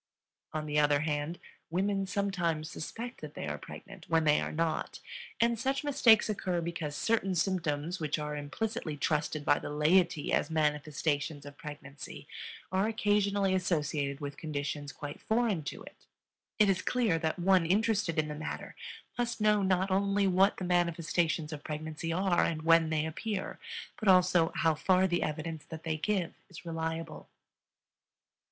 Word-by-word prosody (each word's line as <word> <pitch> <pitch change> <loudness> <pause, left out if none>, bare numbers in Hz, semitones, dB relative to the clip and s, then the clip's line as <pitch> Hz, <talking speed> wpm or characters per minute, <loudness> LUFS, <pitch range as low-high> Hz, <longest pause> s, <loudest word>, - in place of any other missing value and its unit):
On 155 -1 -3
the 150 0 +1
other 145 -1 +4
hand, 150 +2 -1 0.3
women 195 +3 0
sometimes 175 -5 -1
suspect 235 +9 -6
that 150 -1 -8
they - - -4
are 75 0 -3
pregnant - - -11
when 165 -1 +3
they 150 -1 +4
are - - -3
not; 165 0 -1 0.4
and 235 -1 +2
such 270 +4 0
mistakes 240 -6 +5
occur 185 -4 -1
because 170 -3 -3
certain 195 0 +1
symptoms 170 -2 0
which 155 -2 -1
are 150 -1 -3
implicitly 150 +2 -3
trusted 150 0 -1
by 145 - +4
the - - -6
laity 155 +2 +2
as - - +2
manifestations 150 -1 0
of 145 0 -9
pregnancy 145 -1 -9 0.4
are 190 +3 +2
occasionally 205 -3 +2
associated 150 -6 0
with 145 -1 -6
conditions 145 -1 -4
quite 145 0 -8
foreign 220 -6 +1
to - - -5
it. - - -15 0.5
It 210 - +5
is 190 -2 +2
clear 225 -10 +1
that 160 +1 -1
one 180 -1 +4
interested 205 -3 +2
in 155 -1 +2
the 150 - -4
matter 150 +1 -6 0.4
must 240 -1 -1
know 210 -1 +4
not 190 0 +1
only 200 +1 +2
what 190 +2 +4
the 185 - -3
manifestations 170 -2 +1
of 145 - -7
pregnancy 155 +1 -4
are 180 0 +2
and 155 -2 -1
when 165 -1 +5
they 155 -1 +1
appear, 190 +5 -4 0.4
but 215 - -3
also 180 -3 +5
how 160 -1 +3
far 185 +4 +3
the 175 -2 +1
evidence 155 0 -3
that 160 0 -8
they 160 -1 -1
give 185 +1 -1 0.2
is 180 -1 -11
reliable. 165 0 -4
165 Hz, 160 wpm, -31 LUFS, 150-195 Hz, 0.5 s, mistakes